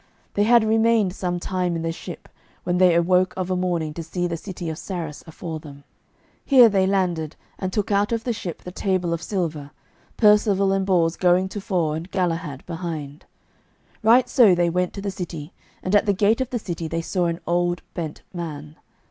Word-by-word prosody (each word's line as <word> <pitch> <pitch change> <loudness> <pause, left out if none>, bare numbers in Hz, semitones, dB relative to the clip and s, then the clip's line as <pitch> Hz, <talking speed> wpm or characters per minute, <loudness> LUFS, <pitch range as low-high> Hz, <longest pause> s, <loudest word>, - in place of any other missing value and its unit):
They 205 - +2
had 235 0 +6
remained 220 -3 +3
some 175 -2 -2
time 180 -1 -1
in 165 - -3
the 165 - -1
ship, 165 - -9 0.4
when 180 0 0
they 180 -2 +5
awoke 180 +2 +3
of 185 0 -2
a - - +1
morning 175 -4 -1
to 170 - -5
see 175 +2 -3
the 170 -1 -2
city 175 0 -7
of 160 +1 -4
Sarras 165 -6 -5
afore 160 0 -6
them. 140 -2 -12 0.6
Here 255 -5 +7
they 190 -2 +2
landed, 175 -5 0 0.2
and 185 -1 -2
took 210 0 -1
out 200 +2 +2
of 230 -1 -1
the 240 - -1
ship 180 -6 -6
the 180 - -7
table 180 -2 -1
of 170 - -3
silver, 160 -8 -3 0.5
Percivale 205 -3 +4
and 195 0 0
Bors 170 -3 +2
going 180 +1 +3
tofore 185 -6 -1
and 165 +4 -6
Galahad 165 -7 -2
behind. 160 -3 -6 0.8
Right 240 +3 +5
so 240 -7 +5
they 175 -1 +2
went 180 +1 0
to 200 - -6
the 200 - -2
city, 170 -4 -7 0.3
and 185 - -2
at 205 - +4
the 200 - +4
gate 210 +5 +2
of 260 - -2
the 245 - -2
city 170 -6 -4
they 165 +1 -3
saw 180 0 0
an 170 0 -2
old 175 +1 0
bent 160 -4 -5
man. 155 -3 -7
180 Hz, 200 wpm, -23 LUFS, 165-200 Hz, 0.8 s, Here